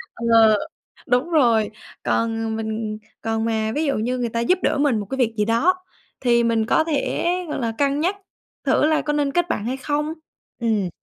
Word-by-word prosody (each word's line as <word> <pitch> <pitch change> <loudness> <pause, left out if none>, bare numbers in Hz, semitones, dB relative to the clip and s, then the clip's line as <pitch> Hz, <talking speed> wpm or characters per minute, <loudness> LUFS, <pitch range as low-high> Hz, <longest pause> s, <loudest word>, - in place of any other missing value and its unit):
Ờ, 225 -2 +5 0.5
đúng 250 +6 +1
rồi, 235 -10 +3 0.3
còn 225 -1 0
mình 220 -1 -3 0.2
còn 225 0 -1
mà 220 -1 0
ví 310 +2 0
dụ 280 - +1
như 245 +4 -1
người 240 -1 -1
ta 230 - -2
giúp 350 +11 +2
đỡ - - +2
mình 280 -6 +2
một 205 - -4
cái 265 - -3
việc 235 -4 +1
gì 210 - +2
đó 235 +12 +3 0.5
thì 235 -2 +3
mình 230 -1 +1
có 315 - +3
thể, 310 -1 -1 0.2
gọi - - -3
là, 230 -1 0
cân 280 0 +1
nhắc 360 +5 +1 0.5
thử - - +3
là 310 0 +2
có 295 - -2
nên 290 -1 +1
kết 350 +3 0
bạn 210 - -2
hay 255 +3 -2
không. 295 +3 -2 0.5
Ừm. 215 -5 +1
235 Hz, 200 wpm, -22 LUFS, 225-290 Hz, 0.5 s, Ờ